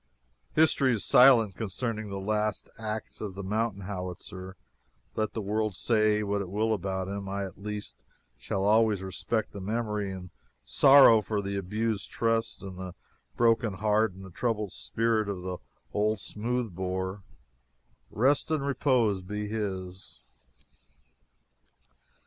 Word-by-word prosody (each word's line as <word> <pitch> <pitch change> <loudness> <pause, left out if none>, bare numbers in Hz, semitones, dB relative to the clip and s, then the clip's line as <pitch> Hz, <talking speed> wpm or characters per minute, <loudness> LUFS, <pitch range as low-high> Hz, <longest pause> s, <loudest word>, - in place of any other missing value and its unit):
History 145 -4 +4
is 110 - -2
silent 120 -7 +6
concerning 110 0 -3
the 100 - -4
last 105 +1 -1
acts 110 0 -5
of 100 -4 -5
the 100 - -6
mountain 105 +1 -1
howitzer. 95 -1 -6 0.6
Let 110 -1 -1
the 110 - -3
world 105 0 -1
say 110 0 +2
what 100 0 -1
it 95 - -5
will 110 +3 +1
about 95 -2 -2
him, 100 0 -5
I, 100 0 -2
at 95 0 -11
least, 105 0 -6 0.3
shall 95 - -3
always 105 -2 +3
respect 95 +4 -2
the 100 - -8
memory 105 -1 -2
and 90 -1 -8 0.3
sorrow 130 - +7
for 105 0 -2
the 100 0 -3
abused 105 +2 -2
trust 115 -2 -1
and 95 -2 -8
the 95 -1 -7 0.4
broken 115 -2 +3
heart 105 0 +2
and 95 +1 -11
the 95 - -11
troubled 105 -1 -1
spirit 115 -2 0
of 95 -3 -4
the 90 -1 -4 0.4
old 105 +1 +1
smooth 115 0 -2
bore. 95 +2 -3 0.9
Rest 135 +8 +2
and 155 -3 0
repose 125 -8 +2
be 105 +3 -4
his! 95 -4 -5
105 Hz, 140 wpm, -28 LUFS, 95-110 Hz, 0.9 s, sorrow